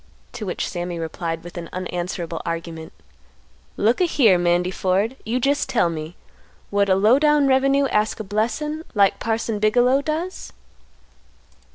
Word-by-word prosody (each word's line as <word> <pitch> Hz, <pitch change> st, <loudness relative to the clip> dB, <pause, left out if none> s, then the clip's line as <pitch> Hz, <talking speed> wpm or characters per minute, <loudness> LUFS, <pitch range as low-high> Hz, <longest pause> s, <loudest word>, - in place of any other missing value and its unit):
To 225 Hz, -5 st, -6 dB
which 180 Hz, -, -2 dB
Sammy 175 Hz, -1 st, -4 dB
replied 165 Hz, 0 st, -4 dB
with 175 Hz, 0 st, -8 dB
an 170 Hz, -, -8 dB
unanswerable 175 Hz, -2 st, -4 dB
argument; 165 Hz, -1 st, -5 dB, 0.9 s
"Look 225 Hz, -, +2 dB
a -, -, +5 dB
here, 225 Hz, -, +4 dB
Mandy 175 Hz, +1 st, +1 dB
Ford; 195 Hz, +6 st, 0 dB
you 240 Hz, +3 st, 0 dB
jest 280 Hz, +3 st, 0 dB
tell 175 Hz, -8 st, +2 dB
me, 160 Hz, +1 st, -6 dB, 0.6 s
would 200 Hz, 0 st, +2 dB
a 190 Hz, -, +5 dB
low 215 Hz, +7 st, +4 dB
down 295 Hz, -1 st, +4 dB
revenue 275 Hz, +1 st, +3 dB
ask 210 Hz, +1 st, 0 dB
a -, -, -3 dB
blessin' 230 Hz, +10 st, -2 dB
like 200 Hz, -2 st, +3 dB
Parson 225 Hz, -1 st, -2 dB
Bigelow 245 Hz, +5 st, +3 dB
does?" 320 Hz, +5 st, -4 dB
205 Hz, 150 wpm, -22 LUFS, 175-255 Hz, 0.9 s, a